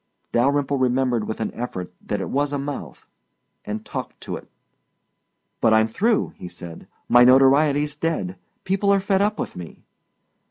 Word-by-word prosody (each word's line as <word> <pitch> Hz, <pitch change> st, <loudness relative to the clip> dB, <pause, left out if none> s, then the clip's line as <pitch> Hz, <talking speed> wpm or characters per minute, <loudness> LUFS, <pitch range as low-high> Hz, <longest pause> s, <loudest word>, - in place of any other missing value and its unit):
Dalyrimple 140 Hz, +3 st, +2 dB
remembered 125 Hz, -3 st, +1 dB
with 110 Hz, -, -4 dB
an -, -, -2 dB
effort 95 Hz, -7 st, -5 dB
that 105 Hz, -, -2 dB
it -, -, -4 dB
was 145 Hz, +1 st, 0 dB
a 145 Hz, -, -1 dB
mouth, 140 Hz, +1 st, -6 dB, 0.6 s
and 105 Hz, +1 st, -5 dB
talked -, -, -6 dB
to -, -, -5 dB
it. -, -, -10 dB, 1.1 s
"But 110 Hz, -1 st, +4 dB
I'm 110 Hz, 0 st, +5 dB
through," 200 Hz, -, 0 dB
he -, -, -8 dB
said. 85 Hz, -2 st, -10 dB, 0.2 s
"My 120 Hz, 0 st, +7 dB
notoriety's 140 Hz, +3 st, +5 dB
dead. 145 Hz, -, -2 dB, 0.3 s
People 195 Hz, +1 st, +1 dB
are 200 Hz, -, +4 dB
fed 195 Hz, 0 st, +1 dB
up 210 Hz, +1 st, +1 dB
with -, -, -4 dB
me." 85 Hz, -2 st, -10 dB
135 Hz, 160 wpm, -23 LUFS, 110-150 Hz, 1.1 s, My